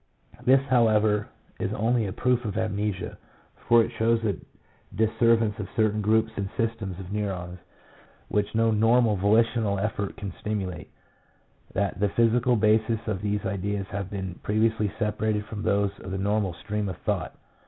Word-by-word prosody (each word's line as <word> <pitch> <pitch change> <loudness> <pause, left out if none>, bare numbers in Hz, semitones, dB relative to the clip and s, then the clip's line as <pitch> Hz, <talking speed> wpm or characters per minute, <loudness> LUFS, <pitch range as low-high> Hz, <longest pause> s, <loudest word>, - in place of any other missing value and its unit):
This, 135 +1 +5
however, 110 -4 +3 0.3
is 95 - -1
only 115 +1 +1
a - - -4
proof 125 +3 +1
of 105 -3 -3
amnesia, 105 -3 -2 0.5
for 115 -1 +6
it 115 - -4
shows 115 0 +1
a 100 -3 +1 0.6
disseverance 110 0 +2
of 100 -3 -5
certain 110 -1 +2
groups 110 +2 +2
and 100 -1 -3
systems 110 -5 -2
of 95 +1 -7
MEMORY. 105 - -1
yi - - 0
neurons, 90 -2 -6 0.7
which 105 +1 -1
no 115 0 +3
normal 115 +1 +4
volitional 105 +1 +2
effort 100 0 -2
can 100 -2 -5
stimu 105 -2 -1
late: 75 -3 -10 0.9
that 100 -1 -1
the 100 0 +2
physical 120 +3 +3
bases 110 +1 +3
of 105 -4 -2
these 105 0 -1
ideas 100 +1 -2
have 100 -1 -4
been 95 -3 -5
previously 110 -1 +1
separated 105 -1 -1
from 105 -1 -6
those 100 -1 +1
of 95 - -8
the 95 - -3
normal 100 -2 0
stream 105 +2 -3
of 90 - -6
thought. - - -1
105 Hz, 165 wpm, -26 LUFS, 100-115 Hz, 0.9 s, for